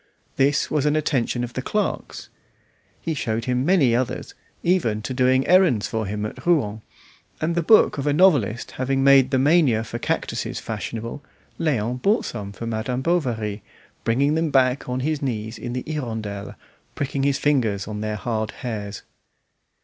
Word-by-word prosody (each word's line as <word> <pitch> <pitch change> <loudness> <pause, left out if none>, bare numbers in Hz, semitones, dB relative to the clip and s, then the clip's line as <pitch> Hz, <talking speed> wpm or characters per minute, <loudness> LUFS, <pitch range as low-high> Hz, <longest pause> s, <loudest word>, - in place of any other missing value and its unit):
This 140 +2 +2
was 150 -1 +1
an 150 - +2
attention 130 -5 0
of 120 0 -5
the 130 - -3
clerk's. 210 +9 -3 0.7
He 165 - -2
showed 115 -5 -2
him 125 0 0
many 145 -8 +4
others, 125 +1 -2 0.3
even 120 - +1
to 130 - -3
doing 130 +1 +3
errands 180 - +4
for 110 -2 -2
him 105 +1 -3
at 105 - -7
Rouen; 115 -12 +1 0.6
and 160 +2 0
the 170 - +1
book 190 -3 +5
of 140 - -2
a - - +3
novelist 145 - +3
having 135 +1 -1
made 135 -1 +6
the 130 - +2
mania 135 -5 +3
for - - -6
cactuses - - -2
fashionable, 115 +5 -5 0.4
Léon 125 -6 0
bought 210 +3 +2
some 100 -4 -5
for 110 +3 -7
Madame 115 +3 -2
Bovary, 115 -11 -1 0.4
bringing 140 +6 +2
them 160 0 +1
back 130 -1 +2
on 125 +1 -1
his 150 +1 -1
knees 110 -4 -3
in 120 0 -5
the 125 - -3
"Hirondelle," 110 -9 -4 0.4
pricking 140 -1 -2
his 140 0 +2
fingers 115 -11 +1
on 105 -1 -5
their 110 0 -2
hard 110 -1 -2
hairs. 105 -5 -5
130 Hz, 165 wpm, -23 LUFS, 110-145 Hz, 0.7 s, made